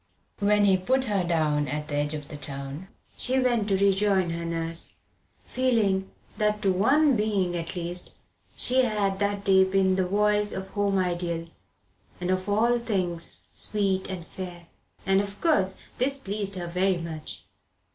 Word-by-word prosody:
When 205 0 +3
he 190 -2 +5
put 260 +8 +1
her 205 -5 0
down 155 -4 +1
at 150 +2 -3
the 150 - -6
edge 145 +1 -1
of 150 -2 -8
the - - -7
town 140 +3 -6 0.3
she 255 +1 0
went 240 -5 +1
to 195 -2 +2
rejoin 195 -2 +2
her 170 0 -4
nurse 165 0 -3 0.5
feeling 215 -7 +1 0.3
that 210 0 +1
to 195 -2 +3
one 225 +11 +3
human 295 -4 +4
being, 200 -4 0
at 165 +1 -4
least, 175 0 -4 0.4
she 255 +1 +3
had 205 -4 0
that 200 0 -1
day 190 -1 +6
been 190 0 +2
the 185 -1 +1
voice 210 +1 +2
of 190 0 -5
the - - -19
home 200 -1 +1
ideal, 175 -2 -1 0.7
and 180 +1 -1
of 185 +1 -1
all 235 +4 +3
things 185 -7 0
sweet 195 -3 0
and 180 -3 -5
fair. 175 -1 -8 0.4
And, 195 0 +3
of 200 0 -7
course, 195 - +2 0.2
this 275 +3 +2
pleased 200 -4 -1
her 180 -2 -4
very 180 +2 +1
much. 160 -2 -7
190 Hz, 170 wpm, -26 LUFS, 175-210 Hz, 0.7 s, day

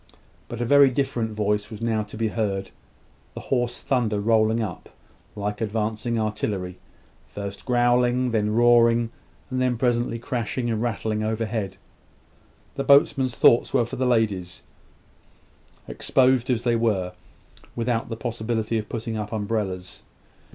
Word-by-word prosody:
But 120 - -7
a - - 0
very 140 +2 +6
different 130 -4 -1
voice 105 -1 -1
was 110 -3 -8
now 115 -2 0
to 105 +1 -8
be 110 0 0
heard 100 -3 -2 0.6
the - - -5
hoarse 120 -2 -1
thunder 115 -6 0
rolling 110 +1 +2
up, 105 -7 -5 0.5
like 105 +1 -3
advancing 110 +2 -1
artillery; 105 -4 -3 0.5
first 100 -1 -7
growling, 125 0 +2
then 105 -1 0
roaring, 120 -1 +4 0.4
and 130 -1 0
presently 120 -1 +1
crashing 120 0 -2
and 110 -1 -1
rattling 110 -2 -1
overhead. 110 -3 -2 1.0
The 140 - -1
boatmen's 135 -2 +4
thoughts 120 - +4
were 120 - +3
for 120 - -7
the 130 0 +1
ladies, 100 -7 0 1.2
exposed 130 -1 +2
as 120 -2 +1
they 120 -1 +2
were, 100 -6 0 0.6
without 115 -1 -1
the 115 - -4
possibility 115 -1 -2
of 105 - -7
putting 115 -1 -4
up 105 -1 -4
umbrellas. 100 -4 -3
115 Hz, 135 wpm, -24 LUFS, 105-120 Hz, 1.2 s, very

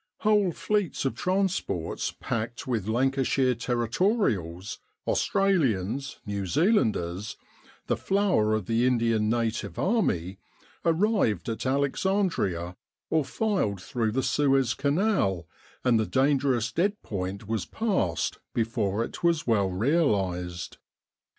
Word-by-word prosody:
Whole 210 -4 +3
fleets 205 -3 -1
of 135 - +1
transports, 185 - -1
packed 115 +1 -3
with 115 -6 -2
Lancashire 130 +2 +2
Territorials, 120 - -1 0.3
Australians, 135 - +1
New 100 -2 -3
Zealanders, 105 - +1 0.5
the - - +1
flower 190 - +2
of 110 -3 -2
the 115 +4 +2
Indian 115 -3 +2
Native 115 -5 -1
Army, 95 - 0 0.4
arrived 170 - +2
at 115 +3 -3
Alexandria 140 - 0 0.4
or 160 -1 +3
filed 185 - -1
through 110 +3 -2
the 130 +1 0
Suez 135 -4 +2
Canal, 140 - +1 0.4
and 120 -3 +4
the 110 - 0
dangerous 130 -3 +2
dead 200 - 0
point 100 +1 -4
was 110 -2 -2
passed 185 - -1 0.2
before 110 -2 0
it - - -8
was 170 -2 +2
well 100 -5 +2
realised. 95 - 0
120 Hz, 110 wpm, -27 LUFS, 100-165 Hz, 0.5 s, and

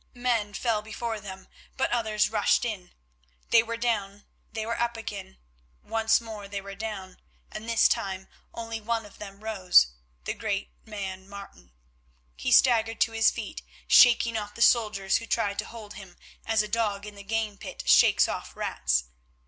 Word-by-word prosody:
Men 235 -4 0
fell 225 -4 0
before 220 +1 -4
them, 190 -2 -9 0.3
but 265 - 0
others 215 -3 +1
rushed 215 +2 +2
in. 195 -6 -5 0.6
They 230 - +7
were 230 0 -5
down, 205 -4 -2 0.3
they 220 -1 -4
were 230 +1 -3
up 235 -1 -1
again, 205 - -7 0.5
once 225 0 +2
more 220 -3 -8
they 200 0 -4
were 200 0 -9
down, 195 -3 -6 0.3
and 215 +2 -7
this 230 -1 +5
time 190 -4 -2 0.2
only 230 -1 -6
one 225 0 -2
of 205 - -15
them 200 0 -10
rose, 185 - +4 0.3
the - - -2
great 205 -3 -3 0.2
man 195 -2 -6
Martin. 200 - -11 0.6
He - - -3
staggered 225 -3 +4
to - - +3
his 225 0 +4
feet, - - -6 0.3
shaking 235 -2 +6
off 210 -1 -4
the 230 - +2
soldiers 210 -5 +3
who 230 - -8
tried 205 -4 0
to - - -1
hold 220 -3 -10
him, 190 -3 -12 0.3
as 220 -1 +3
a - - -5
dog 210 -2 -1
in 210 - -8
the 200 - -11
game 210 0 -2
pit - - -8
shakes - - +6
off - - -5
rats. 60 -1 0
215 Hz, 175 wpm, -27 LUFS, 200-225 Hz, 0.6 s, They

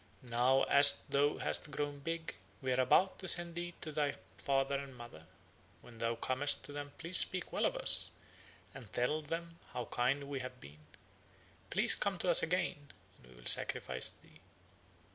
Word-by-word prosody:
Now, 125 +3 +2
as 140 0 +5
thou 145 +1 0
hast - - +2
grown 145 0 -5
big, 165 +3 -5 0.3
we 130 -1 -2
are 125 - -1
about 185 +9 +2
to 190 - -7
send 175 -1 +2
thee 175 0 -7
to 155 - -4
thy 145 -2 -2 0.2
father 135 0 -1
and 135 -2 -10
mother. 100 -10 -13 0.5
When 115 -2 -16
thou 115 0 -2
comest 140 +4 +1
to - - -9
them 145 0 -8
please 175 +2 +4
speak 185 -1 +3
well - - +1
of - - -5
us, - - +6 0.6
and 120 -8 -13
tell 125 +9 -2
them 165 +2 -7
how 120 - -5
kind 130 +5 -2
we 140 -1 -6
have 125 0 -9
been; 75 - -15 0.9
please - - +4
come 200 -2 0
to 175 +1 0
us 170 - +7
again 165 -4 -3 0.3
and 60 - -21
we 65 - -18
will - - -17
sacrifice - - +2
thee." - - -19
140 Hz, 180 wpm, -33 LUFS, 125-165 Hz, 0.9 s, us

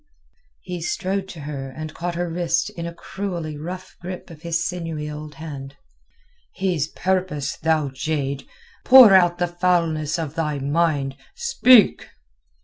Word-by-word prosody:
He 180 -2 -6
strode 190 +3 -2
to 170 -5 -9
her 140 -2 -5
and 155 +3 -7
caught 175 0 -4
her 175 +1 -1
wrist 170 0 0
in 170 0 -6
a - - -5
cruelly 170 -5 -5
rough 180 +5 -7
grip 180 0 -7
of 155 -2 -12
his 170 0 -1
sinewy 165 -4 -4
old 150 0 -7
hand. 140 -3 -8 0.8
"His 180 -6 0
purpose, 180 -5 -1
thou 155 -2 +1
jade! 140 0 -3 0.4
Pour 255 -6 +9
out 175 -2 +5
the 175 - +1
foulness 170 -3 0
of 160 -3 -4
thy 155 -3 -1
mind. 140 -1 0 0.2
Speak!" 255 -5 +4
165 Hz, 140 wpm, -22 LUFS, 150-180 Hz, 0.8 s, Pour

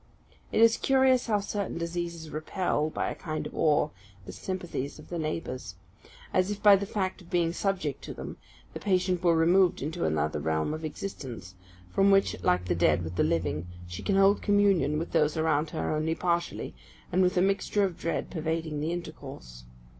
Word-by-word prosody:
It - - +2
is 230 0 +6
curious 265 -2 +3
how 210 -3 +2
certain 200 -2 -3
diseases 170 -1 -4
repel, 155 0 -1
by - - -2
a - - -3
kind 155 -1 -4
of - - -7
awe, 150 -1 +2 0.3
the - - -7
sympathies 175 -7 -4
of - - -14
the 175 - -3
neighbours: 130 - -4 0.6
as 185 +1 +2
if, 205 0 -5
by 205 -1 +9
the 200 0 -2
fact 190 -2 -2
of 175 - -16
being 170 -2 +1
subject 180 -8 -2
to - - -6
them, - - -7 0.4
the - - -5
patient 185 -2 +1
were 170 -2 +4
removed 175 +3 +4
into 160 +4 -3
another 75 0 0
realm 80 - 0
of 155 +1 -6
existence, 135 - -6 0.4
from 195 - +4
which, 195 0 +4
like 90 +1 +2
the 90 - +1
dead 85 -1 +2
with 80 +2 -6
the - - +2
living, 85 0 -1 0.2
she 90 0 -7
can 200 - 0
hold 195 +1 +5
communion 200 -7 +3
with 165 +2 -3
those 155 -1 +2
around 155 -1 +1
her 155 -1 -2
only 160 +1 0
partially, 170 -1 -1 0.4
and 185 - +3
with 180 0 +2
a - - +5
mixture 200 +1 +1
of 185 -4 -2
dread 165 - -2
pervading 160 -2 -2
the 155 +3 -1
intercourse. 135 - -8
165 Hz, 190 wpm, -28 LUFS, 145-190 Hz, 0.6 s, by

